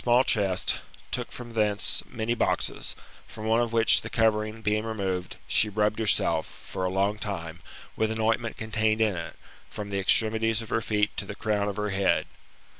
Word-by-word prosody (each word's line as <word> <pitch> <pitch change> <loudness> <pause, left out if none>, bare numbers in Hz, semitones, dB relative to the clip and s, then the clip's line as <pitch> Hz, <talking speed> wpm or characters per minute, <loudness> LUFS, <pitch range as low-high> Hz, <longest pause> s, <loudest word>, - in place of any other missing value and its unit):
tits - - -13
MBTAMbRPHOdlS, 120 +1 +6
Ot 130 - +3
chest, 100 -4 +2 0.4
took - - -2
from 120 -1 -8
thence 105 -2 +1
many 115 -1 -2
boxes, 120 - 0 0.3
from 110 - -9
one 115 +2 +3
of 120 -1 -1
which 115 -1 +5
the - - -7
covering 110 0 +1
being 105 +1 +1
removed, 95 -5 -3
she 110 - +3
rubbed 105 +1 0
herself, 110 -2 +2
for 95 - -7
a 90 - +1
long 100 +3 0
time, 85 -6 -5 0.4
with 110 - +1
an 110 0 -3
ointment 115 +1 0
contained 110 0 0
in 110 -4 +2
it, 85 - -6 0.3
from 105 -1 -6
the 100 - -1
extremities 110 +2 +3
of 110 - -11
her 115 - 0
feet 105 -1 0
to 100 - -3
the 100 - -7
crown 105 -2 0
of 100 - -4
her 105 0 -2
head. 95 0 +2
110 Hz, 195 wpm, -27 LUFS, 100-110 Hz, 0.4 s, MBTAMbRPHOdlS